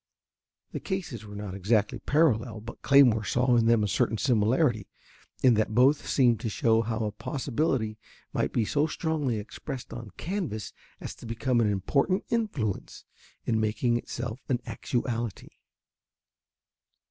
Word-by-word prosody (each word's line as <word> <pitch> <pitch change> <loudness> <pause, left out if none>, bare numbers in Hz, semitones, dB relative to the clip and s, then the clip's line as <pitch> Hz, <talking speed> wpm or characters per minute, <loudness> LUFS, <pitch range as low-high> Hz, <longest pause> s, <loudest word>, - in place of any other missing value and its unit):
The - - -4
cases 170 - -4
were 105 - -9
not 100 -2 -5
exactly 105 +2 +1
parallel, 125 -7 +1
but 115 +2 -10
Claymore 130 -6 +5
saw 125 +2 +2
in 115 -1 +3
them 115 -2 +4
a - - +1
certain 105 +3 +1
similarity, 115 - +2 0.6
in 130 -2 +7
that 110 0 0
both 135 +4 +4
seemed 120 -5 +3
to 115 - -3
show 115 -1 +2
how 115 0 -2
a 105 - -2
possibility 125 -2 -2 0.3
might - - 0
be 115 - +1
so 145 +7 +1
strongly 150 -7 -1
expressed 125 +5 -7
on 115 -3 -7
canvas 175 - -4 0.3
as - - -6
to - - -10
become 120 +1 +1
an 110 - +2
important 140 - +1
influence 200 - -2 0.4
in 110 -1 +1
making 110 +3 +1
itself 120 0 -4
an 125 -2 +1
actuality. 120 -3 -3
120 Hz, 145 wpm, -28 LUFS, 110-135 Hz, 0.6 s, in